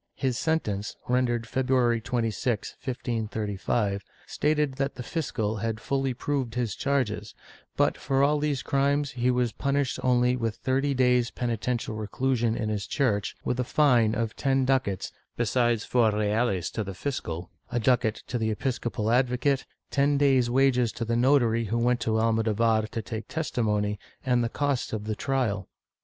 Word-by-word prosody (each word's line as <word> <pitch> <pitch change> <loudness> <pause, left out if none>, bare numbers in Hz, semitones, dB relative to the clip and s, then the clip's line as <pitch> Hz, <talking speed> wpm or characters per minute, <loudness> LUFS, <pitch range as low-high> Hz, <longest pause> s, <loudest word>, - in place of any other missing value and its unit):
His 130 -3 -1
sen 160 +5 +1
tence, 100 0 -4
rendered 120 -2 +1
February 125 -1 +1
26, 120 -1 -1
1535, 110 -4 -2 0.2
stated 150 -2 0
that 140 0 -1
the 125 - -6
fiscal 115 -8 -2
had 110 +1 -2
fully 135 +1 -1
proved 130 -3 -2
his 120 -3 -1
charges, 125 -8 -1 0.4
but - - +3
for 135 0 +1
all 150 +1 +3
these 145 -3 -1
crimes 140 +1 +1
he 125 0 0
was 125 -2 +1
punished 140 +1 -1
only 125 0 +3
with 115 -3 -2
thirty 135 +2 0
days' 125 -1 +3
penitential 120 -1 -2
reclusion 115 +2 0
in 110 - -2
his 105 -2 -2
church, 105 -8 0
with 125 - -1
a - - +2
fine 120 -5 +3
of 115 -1 -2
ten 135 -2 +1
ducats, 130 -8 0 0.3
besides 120 0 +1
four 120 -3 +3
reales 105 -2 0
to 110 - -2
the 95 -1 -6
fiscal, 90 - -4 0.2
a 120 - 0
ducat 120 -2 +1
to 120 - -3
the 110 -1 0
episcopal 115 -1 -1
advocate, 130 +2 +2 0.2
ten 140 +1 +2
days' 135 -4 +3
wages 125 -2 +3
to 115 - -4
the 115 +1 0
notary 120 -2 +3
who 115 +3 -1
went 120 +1 +2
to 110 0 0
Almodovar 110 0 +2
to 115 0 -5
take 110 -1 -6
testimony, 105 -9 -1 0.3
and 125 -2 +2
the 115 - 0
costs 140 -2 -1
of 110 -2 -2
the 110 0 -2
trial. 115 -9 -1
120 Hz, 160 wpm, -27 LUFS, 110-130 Hz, 0.4 s, but